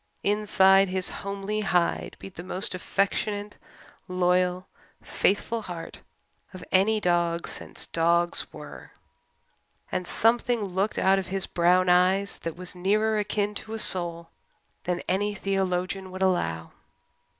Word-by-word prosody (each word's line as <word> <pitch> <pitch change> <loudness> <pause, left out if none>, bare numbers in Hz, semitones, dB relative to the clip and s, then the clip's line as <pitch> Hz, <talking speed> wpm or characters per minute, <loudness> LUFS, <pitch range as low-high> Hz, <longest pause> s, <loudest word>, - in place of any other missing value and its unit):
Inside 195 -2 +4
his 185 0 +1
homely 200 +1 -4
hide 180 -4 0
beat 195 - -11
the 175 - -8
most 185 +2 -3
affectionate, 205 +2 -1 0.5
loyal, 180 0 +1 0.4
faithful 225 +3 0
heart 175 -5 -8 0.6
of 185 - -9
any 210 +4 +3
dog 170 -2 0
since - - -4
dogs 170 +1 +1
were; 150 -1 -11 1.0
and 180 - -2
something 235 +2 +2
looked 195 +2 -1
out 195 0 +4
of 190 - -5
his 190 0 -2
brown 180 +1 +3
eyes 185 +3 +3
that 165 -1 -5
was 180 0 -3
nearer 210 +4 +1
akin 210 0 -1
to 220 +1 -5
a - - -3
soul 170 -4 +1 0.5
than 180 0 -2
any 205 +2 0
theologian 190 -1 -2
would 185 +1 -4
allow. 80 - 0
185 Hz, 130 wpm, -26 LUFS, 180-200 Hz, 1.0 s, Inside